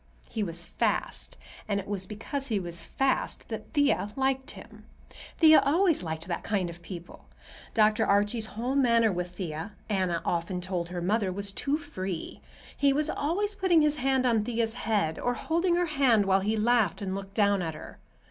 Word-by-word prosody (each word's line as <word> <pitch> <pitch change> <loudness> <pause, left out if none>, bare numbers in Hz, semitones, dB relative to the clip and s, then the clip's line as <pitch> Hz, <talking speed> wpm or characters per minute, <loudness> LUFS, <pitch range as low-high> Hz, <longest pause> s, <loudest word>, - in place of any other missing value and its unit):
He 225 - -2
was 170 -3 -2
"fast," - - -2 0.3
and 200 -1 0
it 200 - -7
was 195 -2 -2
because 270 +7 -5
he 215 -4 0
was 170 -2 -4
"fast" 270 +9 -1
that - - -6
Thea 285 -8 +2
liked 265 +1 0
him. - - -11 0.5
Thea 315 -2 +8
always 335 +3 +3
liked 160 -1 -5
that 175 - -3
kind 190 -5 -1
of 170 +1 -13
people. 170 -1 -10 0.5
Dr. 215 0 +3
Archie's 205 +3 +2
whole 245 +3 -1
manner 235 -5 +4
with 180 0 -4
Thea, 165 +2 -5 0.2
Anna 185 -4 0
often 175 +2 -1
told 180 -2 -3
her 175 -1 -4
mother, 200 +1 +1
was 200 +1 -2
too 280 +8 -1
free. 195 - -6 0.3
He 280 -1 +3
was 300 +2 +1
always 395 +8 -1
putting 365 -5 +3
his 300 0 +2
hand 265 0 +1
on 230 -4 +3
Thea's 230 -1 -1
head, 210 -9 -1
or 245 0 0
holding 340 +2 +1
her 355 0 +2
hand 270 -9 +3
while 195 0 +3
he 210 +3 0
laughed 220 -3 +2
and 190 -1 -3
looked 195 0 -6
down 200 -2 +3
at 160 -3 -3
her. 155 - -11
210 Hz, 185 wpm, -28 LUFS, 185-270 Hz, 0.5 s, Thea